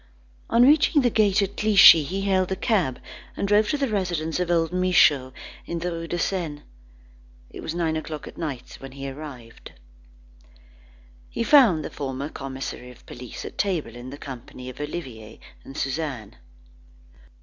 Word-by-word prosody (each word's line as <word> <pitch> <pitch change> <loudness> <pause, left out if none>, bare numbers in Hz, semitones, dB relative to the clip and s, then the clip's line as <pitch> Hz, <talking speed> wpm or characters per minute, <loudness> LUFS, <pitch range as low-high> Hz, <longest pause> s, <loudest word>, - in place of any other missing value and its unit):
On 235 +1 +5
reaching 295 +1 +5
the 245 - +2
gate 205 -2 +3
at 200 +1 -4
Clichy, 205 -6 +8
he 190 +7 -4
hailed 190 -2 +1
a - - +1
cab, 185 - 0 0.4
and 200 - -1
drove 210 +1 +3
to 295 - 0
the 280 -1 0
residence 180 -7 -2
of 180 -1 -1
old 165 0 +1
Michaud 165 -8 +3 0.4
in 170 - -3
the 175 +1 -3
Rue 165 0 -5
de 175 - -3
Seine. 165 -6 -3 0.9
It - - -9
was 160 - -5
nine 165 -2 0
o'clock 155 -1 -6
at - - -11
night 140 -7 -6
when 135 -1 -10
he 140 0 -7
arrived. 135 -5 -10 1.6
He - - -2
found 230 - +5
the - - -6
former 135 +1 -5
commissary 135 -3 -7
of 125 - -16
police 125 -1 -9
at - - -10
table, 170 - -1
in 120 +1 -9
the 140 - -9
company 130 -2 -9
of 130 - -10
Olivier 125 -8 -7 0.2
and 135 - -11
Suzanne. 135 -6 -4
160 Hz, 165 wpm, -24 LUFS, 135-190 Hz, 1.6 s, Clichy